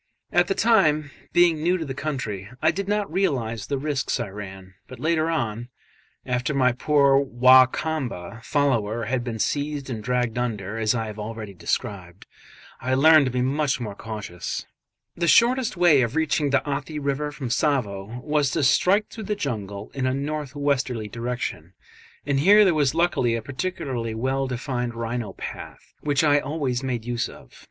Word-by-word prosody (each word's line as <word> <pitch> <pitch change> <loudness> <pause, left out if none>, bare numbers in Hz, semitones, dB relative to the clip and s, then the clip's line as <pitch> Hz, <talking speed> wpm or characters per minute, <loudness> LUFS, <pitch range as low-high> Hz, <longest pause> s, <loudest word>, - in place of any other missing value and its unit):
At 175 0 +3
the 195 - 0
time, 155 -10 +3 0.2
being 170 -3 +4
new 175 +3 +2
to 165 - -4
the 135 - -4
country, 125 -9 -4
I 160 - +3
did 200 0 -4
not 205 0 -1
realise 120 - -1
the 140 - -1
risks 140 -1 -1
I - - -3
ran; 95 -2 -9
but 130 - -11
later 160 0 +1
on 120 -7 -2 0.6
after 125 +3 -1
my 130 -2 +4
poor 140 +2 +3
Wa 130 -1 +6
Kamba 125 - -4
follower 120 -6 0
had 125 +2 -1
been 120 -2 -4
seized 145 +3 -2
and 110 -3 -5
dragged 125 -1 0
under, 110 -3 -3
as 110 +2 +2
I 115 -1 -1
have 105 0 -7
already 110 -1 -6
described 90 0 -4 0.6
I 130 +2 0
learned 155 +1 +6
to - - -1
be 125 0 0
much 140 +1 0
more 110 -4 -5
cautious. 105 -5 -6 0.5
The 170 0 -1
shortest 240 +1 +4
way 170 -6 +5
of 120 +2 -1
reaching 155 -2 +1
the 140 - +1
Athi 145 +2 -3
river 145 +1 -2
from 135 -4 -6
Tsavo 120 -5 -1
was 150 -2 +1
to 160 - 0
strike 195 +10 +3
through 220 -2 -7
the 210 - -1
jungle 105 - -5
in 130 -2 -1
a 130 - 0
north 145 0 -4
westerly 135 -6 -1
direction, 115 -7 -4 0.5
and 140 -1 +1
here 205 +7 +7
there 185 - +4
was 145 -2 +1
luckily 165 -9 +2
a 115 - -3
particularly 130 -5 -3
well 135 +3 -1
defined 125 -1 -3
rhino 115 -3 -3
path - - -9
which 145 0 +1
I 145 -1 +5
always 140 -4 -2
made 125 -4 -3
use 120 -1 -2
of. - - -15
130 Hz, 175 wpm, -24 LUFS, 115-150 Hz, 0.6 s, here